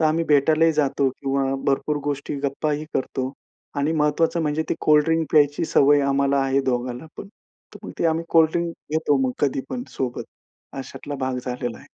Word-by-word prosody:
तर 160 - +3
आम्ही 160 +2 +2
भेटायलाही 155 +3 +4
जातो 140 -2 +1
किंवा 135 0 -1
भरपूर 140 +2 +1
गोष्टी 145 0 -3
गप्पाही 150 +2 -1
करतो. 130 0 -2 0.4
आणि 145 +3 +1
महत्त्वाचं 160 +2 +1
म्हणजे 150 +1 0
ते - - +1
कोल्डड्रिंक 155 +1 +3
प्यायची 145 +1 +3
सवय 145 -1 +4
आम्हाला 140 0 +2
आहे 135 +1 +1
दोघांना 125 +4 -3
पण. 200 - -8 0.5
तर - - -10
मग - - -6
ते 170 - +2
आम्ही 165 +1 0
कोल्डड्रिंक 165 +1 +3 0.2
घेतो 155 -2 +2
मग 125 - -1
कधी 135 -1 +1
पण 250 - -3
सोबत, 125 -2 -3 0.5
अशातला 145 +2 -7
भाग 130 -1 -2
झालेला 125 -1 -4
आहे. - - -16
145 Hz, 170 wpm, -23 LUFS, 135-160 Hz, 0.5 s, भेटायलाही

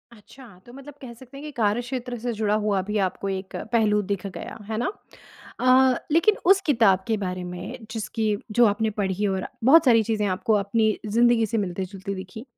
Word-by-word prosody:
अच्छा! 255 +5 -16 0.2
तो 240 - -14
मतलब 275 +2 -11
कह 250 -3 -9
सकते 255 +3 -14
हैं 280 - -9
कि 300 - -6
कार्य 215 +1 +1
क्षेत्र 245 0 -5
से 240 +2 -3
जुड़ा 210 -1 0
हुआ 205 -2 +1
अभी 210 +3 -2
आपको 195 +2 -6
एक 190 0 -5 0.2
पहलू 215 -3 +3
दिख 200 -1 -2
गया, 190 - -8
है 220 - -2
ना? 240 - -1 0.7
अ, 255 0 +5 0.2
लेकिन 335 +7 +4
उस 390 +2 +5
किताब 225 - +4
के 220 -1 +1
बारे 185 -2 -4
में 190 +7 -8
जिसकी 215 -1 -2 0.2
जो 240 +3 +5
आपने 220 +1 +1
पढ़ी 195 +1 0
और 190 -1 -2 0.2
बहुत 305 +6 +6
सारी 230 -3 +5
चीज़ें 215 -1 -1
आपको 190 +4 0
अपनी 215 +1 +1
ज़िंदगी 230 +2 +3
से 225 +2 -2
मिलती-जुलती 190 0 -4
दिखीं 190 +4 -8
220 Hz, 195 wpm, -24 LUFS, 200-245 Hz, 0.7 s, बहुत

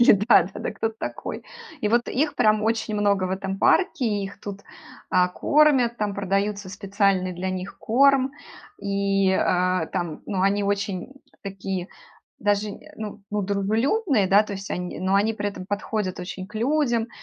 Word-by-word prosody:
Или 240 - +8
да, 210 0 +5
да, 190 - -8
да - - -2
кто 225 - -1
ты 220 - -11
такой? - - -5 0.4
И 210 - +1
вот 235 +2 +2
их 295 +4 0
прям 215 0 +3
очень 220 -1 0
много 200 -2 +2
в 185 - -2
этом 195 0 -3
парке, 335 - +3
их 200 -2 -3
тут, 200 -1 -7 0.5
а, 180 0 +4
кормят, 265 +1 +3
там 210 -1 -1
продаются 200 0 -1
специальный 195 -1 0
для 185 +2 -3
них 185 +1 -6
корм. 270 +3 +3 0.5
И, 195 -1 +1
а, 185 -2 +1
там, 170 -2 -4
ну, 195 -3 -2
они 200 +1 +2
очень 200 +3 -2 0.3
такие 190 -2 -4 0.5
даже, 205 +1 +1
э - - -9 0.2
ну, 215 -1 -7
ну 210 0 0
дружелюбные, 220 - +1
да, 200 +3 +6
то 210 - -7
есть 195 0 -7
они, 180 0 -4
но 190 +1 +1
они 210 +3 +3
при 205 -1 -2
этом 190 -2 -7
подходят 200 -2 -2
очень 185 +1 -6
к 210 - -19
людям 240 -1 +1
200 Hz, 175 wpm, -24 LUFS, 190-220 Hz, 0.5 s, Или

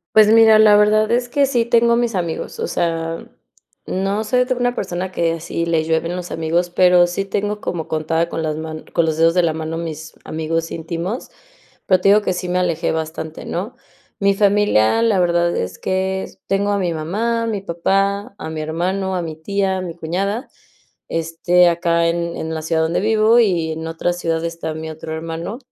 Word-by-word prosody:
Pues, 215 -1 +7
mira 220 0 +7
la 215 -1 +7
verdad 215 +1 +3
es 245 0 0
que 280 +2 +3
sí 245 -4 +1
tengo 235 0 +3
a - - +3
mis 235 -1 0
amigos, 170 -3 -3
o - - -1
sea, 165 -1 -2 0.6
no 195 +3 -1
soy 250 +3 +2
de 255 - -2
una 245 -1 0
persona 185 -2 -3
que 170 -2 0
así 165 0 -3
le 165 -1 +1
llueven 165 +2 -1
los 180 -1 -6
amigos, 165 +2 0
pero, 180 0 +5
sí 175 +3 -3
tengo 205 +1 -3
como 165 -3 -4
contada, 160 +2 0
con 165 - -4
las 155 -1 -2
man 155 0 -6
con 170 - +2
los 160 -1 -1
dedos 165 +1 +4
de 180 +1 +2
la 165 -2 +1
mano 160 +1 -4
mis 160 -1 -6
amigos 165 +1 -2
íntimos, 170 +7 -4 0.6
pero, 185 - +4
te - - +4
digo 210 +1 +6
que 185 -3 -1
sí 180 0 -4
me 180 - +1
alejé 175 -2 0
bastante, 160 0 -5
¿no? 195 +8 -4 0.5
Mi 200 0 +3
familia, 200 - +3
la 225 -4 +3
verdad 175 -1 +2
es 90 - -3
que 190 0 -1 0.2
tengo 200 +1 0
a 200 - +1
mi 180 -3 -1
mamá, 215 +9 -1
a - - -2
mi 210 -4 -2
papá, 195 +3 0
a 175 - -7
mi 160 -1 -5
hermano, 185 +5 -2
a 180 - -1
mi 160 -2 -5
tía, 190 +3 -1
a - - -2
mi 175 -3 -5
cuñada. 195 +8 -2 0.6
Este, 165 +2 +2
acá 170 0 +1
en 170 0 -2
en 160 - -4
la 160 - -3
ciudad 160 0 0
donde 160 +1 0
vivo, 220 +2 +4
y 175 -7 +1
en 160 +1 -5
otra 165 +2 -1
ciudad 165 -2 -2
está 165 -1 -4
mi 160 0 -6
otro 160 0 -7
hermano, 165 +6 -5
175 Hz, 205 wpm, -19 LUFS, 165-200 Hz, 0.6 s, Pues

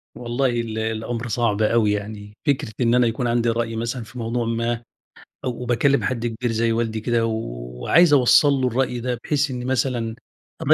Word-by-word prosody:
والله 120 +2 0
ال 115 -2 -2
الأمر 115 +2 -3
صعب 115 -2 0
أوي 110 -1 +3
يعني 105 0 -5
فكرة 130 -6 0
إن 120 0 +3
أنا 125 -1 +4
يكون 120 +2 -1
عندي 120 0 +1
رأي 115 0 -1
مثلًا 115 +2 -3
في 125 +2 -10
موضوع 115 +1 -1
ما، 115 +1 -1 0.6
وباكلم 125 +2 +1
حد 120 -2 -1
كبير 120 +1 -2
زي 115 +1 +1
والدي 115 -1 -1
كده 115 0 +1
وعايز 85 - +1
أوصَّل 140 +2 +6
له 130 -2 +1
الرأي 125 0 0
ده 125 0 -2
بحيث 145 -1 0
إن 125 -1 -4
مثلًا 125 -3 -1 0.5
م - - +7
115 Hz, 175 wpm, -22 LUFS, 115-125 Hz, 0.6 s, م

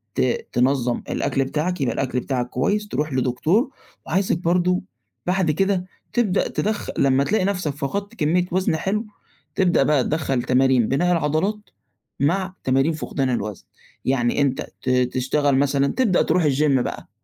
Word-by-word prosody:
ت 465 - 0
تنظم 125 -1 +1
الأكل 135 -1 0
بتاعك، 155 +4 -2
يبقى 120 -4 +1
الأكل 130 -2 -1
بتاعك 125 -2 -2
كويّس، 205 +11 0
تروح 150 -6 -2
لدكتور 155 - +1 0.4
وعايزك 185 0 +1
برضه 180 +1 +1 0.4
بعد 180 -2 +1
كده 190 +3 0 0.3
تبدأ 210 -6 +1
تدخ 215 0 -2
لمّا 135 0 +3
تلاقي 195 +2 +1
نفْسك 180 -7 -1
فقدت 200 +11 -4
كميّة 175 +1 +1
وزن 185 -2 +1
حلو، 205 +7 -1 0.5
تبدأ 180 -7 +3
بقى 145 -2 +3
تِدَخَّل 135 -5 -1
تمارين 130 -2 +3
بناء 175 +7 +1
العضلات، 165 +5 +1 0.6
مع 185 +6 0
تمارين 135 +4 +2
فقدان 135 -3 -2
الوزن. 105 -5 -3 0.4
يعني 130 0 +1
أنت 135 -2 0
ت 130 - -3
تشتغل 130 +2 +1
مثلًا 140 0 +2
تبدأ 210 - +2
تروح 180 - +2
الGym 140 -1 +2
بقى - - -5
150 Hz, 145 wpm, -22 LUFS, 130-185 Hz, 0.6 s, لمّا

